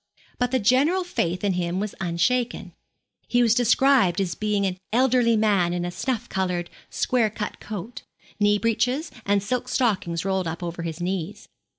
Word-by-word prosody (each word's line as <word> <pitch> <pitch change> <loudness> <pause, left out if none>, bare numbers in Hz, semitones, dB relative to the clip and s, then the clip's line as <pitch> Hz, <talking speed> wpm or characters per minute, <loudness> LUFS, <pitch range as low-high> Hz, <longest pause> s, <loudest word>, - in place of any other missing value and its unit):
But 245 0 +1
the 260 - +1
general 265 - +3
faith 180 - -2
in 200 -2 +2
him 175 0 -1
was 210 0 -3
unshaken. 190 +8 0 0.5
He 245 0 +3
was 230 -2 +4
described 245 -5 +3
as 185 -3 -1
an 200 -3 0
elderly 245 -1 +3
man 200 -5 +2
in 175 0 -2
a 175 - -3
snuff 240 +3 -3
coloured, 180 -2 -2 0.2
square 240 -4 +1
cut 210 0 -5
coat, 215 +2 -7 0.4
knee 205 0 +4
breeches, 245 +7 0 0.2
and 200 -1 +2
silk 250 +4 -2
stockings 195 -9 0
rolled 190 -2 0
up 165 +2 -5
over 170 0 -4
his 165 0 -5
knees. 185 +2 -4
205 Hz, 165 wpm, -24 LUFS, 180-245 Hz, 0.5 s, was